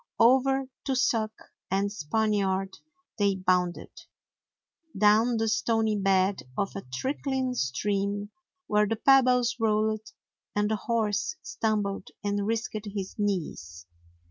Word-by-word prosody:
Over 265 +3 +4 0.2
tussock 250 -5 +1 0.4
and 195 +2 0
"Spaniard" 195 0 -1 0.4
they 200 -1 +3
bounded; 180 -1 0 1.1
down 215 +4 +4
the 225 0 0
stony 225 -1 +1
bed 195 -1 +2 0.2
of 200 - -1
a 195 - -4
trickling 260 - -2
stream 200 - -1 0.3
where 210 0 +2
the 225 - 0
pebbles 250 0 +4
rolled 215 -1 0 0.4
and 210 +1 +1
the - - +2
horse 215 - -1
stumbled 205 -3 -2 0.2
and 205 0 -1
risked 220 -1 -2
his 195 -2 -4
knees. 150 - -3
210 Hz, 110 wpm, -27 LUFS, 195-230 Hz, 1.1 s, Over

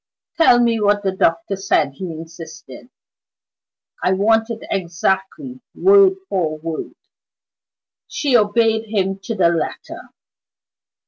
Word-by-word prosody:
"Tell 285 -7 +5
me 230 -2 +1
what 205 0 +2
the 190 - 0
doctor 165 0 0
said," 195 -7 0
he 190 - -5
insisted; 165 +6 -11 1.1
"I 185 - +2
want 225 +4 +2
it 230 -1 -6
exactly, 195 - -2
word 390 0 +5
for 160 - -2
word." 160 0 -6 1.1
She 280 -4 -1
obeyed 220 0 +2
him 195 -2 -1
to 220 +4 -5
the 175 -4 +3
letter. 170 -1 -4
195 Hz, 115 wpm, -19 LUFS, 170-230 Hz, 1.1 s, Tell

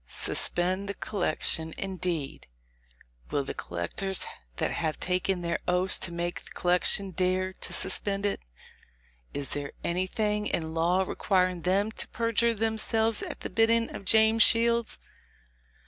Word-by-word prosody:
Suspend 185 +3 -1
the 200 - -3
collection, 160 -4 +1
indeed! 180 -6 -3 0.8
Will 145 - 0
the 135 - -5
collectors, 90 - -1 0.3
that - - -1
have 160 -2 -2
taken 180 0 0
their 170 0 -1
oaths 180 +1 +2
to 170 - -2
make 175 +1 -4
the - - -14
collection, 180 +2 +2
dare 185 +1 0
to - - -8
suspend 200 0 -2
it? 205 - 0 1.0
Is 145 -1 -4
there 145 -1 -4
anything 210 +4 -1
in 160 -1 -2
law 175 +3 +2
requiring 185 -2 0
then 195 +5 +1
to - - -4
perjure 230 0 +1
themselves 220 0 0
at - - -6
the - - -4
bidding 230 +1 +2
of - - -7
James 220 +2 +5
Shields? 235 +1 +5
185 Hz, 135 wpm, -28 LUFS, 175-215 Hz, 1.0 s, James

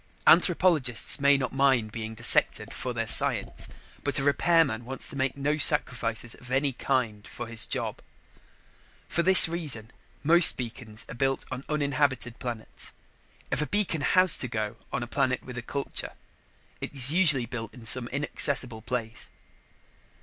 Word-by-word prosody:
Anthropologists 165 - +3
may 140 0 +3
not 130 -2 -4
mind 135 -5 +1
being 110 0 -7
dissected 120 +1 +4
for - - -5
their - - -4
science, - - +1 0.4
but - - 0
a 140 - 0
repairman 145 -4 +1
wants 135 +3 -3
to - - -8
make 135 0 -2
no 145 +2 -1
sacrifices 120 -6 +2
of 125 - -15
any 135 +1 -1
kind 120 -5 -3
for 120 - -8
his 115 -1 -1
job. - - -4 1.1
For 170 - -1
this 185 +1 +8
reason, 145 -10 -5 0.3
most 170 +3 +6
beacons 115 -2 -7
are - - -9
built 135 +2 -2
on 130 +1 -6
uninhabited 140 -4 -2
planets. 120 -3 -6 0.6
If - - -1
a 150 - -3
beacon 200 -7 -1
has 185 +3 +3
to 130 - -1
go 110 -3 -5
on 125 - -3
a - - -8
planet 130 +1 -2
with 125 - -10
a 125 - -5
culture, 140 +4 -5 0.7
it - - -6
is 135 +1 +6
usually 150 -9 +4
built 115 -2 -7
in 120 -3 -15
some 120 +1 0
inaccessible 135 -3 0
place. 115 -1 -5
130 Hz, 155 wpm, -26 LUFS, 120-145 Hz, 1.1 s, this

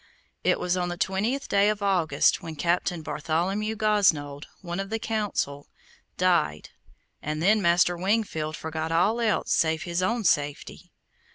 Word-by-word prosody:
It - - +2
was 180 0 0
on 180 -1 -1
the 175 - -5
twentieth 210 +9 -1
day 200 +1 +3
of 210 -1 -2
August 175 -8 +2
when 160 -1 -7
Captain 170 +1 -1
Bartholomew 175 +8 -2
Gosnold, 165 -10 +1
one 175 -1 -5
of 195 0 -4
the 225 - -1
Council, 210 -11 -3 0.5
died, 170 - +1 0.5
and 155 +1 -3
then 210 +6 +3
Master 175 0 +3
Wingfield 175 -5 -1
forgot 160 0 -4
all 200 +8 +2
else 220 -2 0
save 160 0 +1
his 175 +1 -2
own 230 +5 0
safety. 145 -5 -1
175 Hz, 150 wpm, -26 LUFS, 160-205 Hz, 0.5 s, day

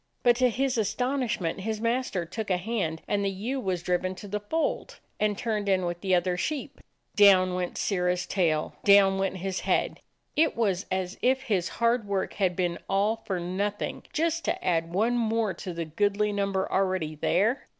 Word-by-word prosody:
But 240 -2 +5
to 255 0 +4
his 255 +1 0
astonishment 220 -4 -1
his 215 +2 -3
master 230 -6 -1
took 210 +5 -5
a 185 - +2
hand, 180 -5 -2
and 200 0 0
the 200 - +1
ewe 220 +8 -3
was 185 -6 -2
driven 180 +1 0
to 205 - -9
the 210 +1 -2
fold, 315 +11 -2 0.2
and 210 -1 +1
turned 215 -4 -1
in 185 -2 +2
with 175 0 -3
the 190 -2 +2
other 180 0 +1
sheep. 290 - -3 0.4
Down 190 -3 +6
went 180 -1 -3
Sirrah's 180 -2 0
tail, 160 -5 0
down 195 -1 +6
went 195 0 -1
his 190 +1 -3
head. - - 0 0.4
It 320 +1 +3
was 200 -5 0
as 185 +1 -2
if 265 +1 +2
his 195 -8 0
hard 235 -2 +2
work 195 -1 -1
had 185 -3 0
been 175 -1 -1
all 200 +3 +2
for 195 -5 -4
nothing; 200 +4 -3
just 330 +1 0
to - - -2
add 165 -1 +1
one 220 +7 +1
more 225 -3 +1
to 180 +2 -6
the 170 -1 -4
goodly 205 +5 0
number 195 -1 0
already 185 -5 0
there. 195 - +1
200 Hz, 185 wpm, -27 LUFS, 180-225 Hz, 0.4 s, Down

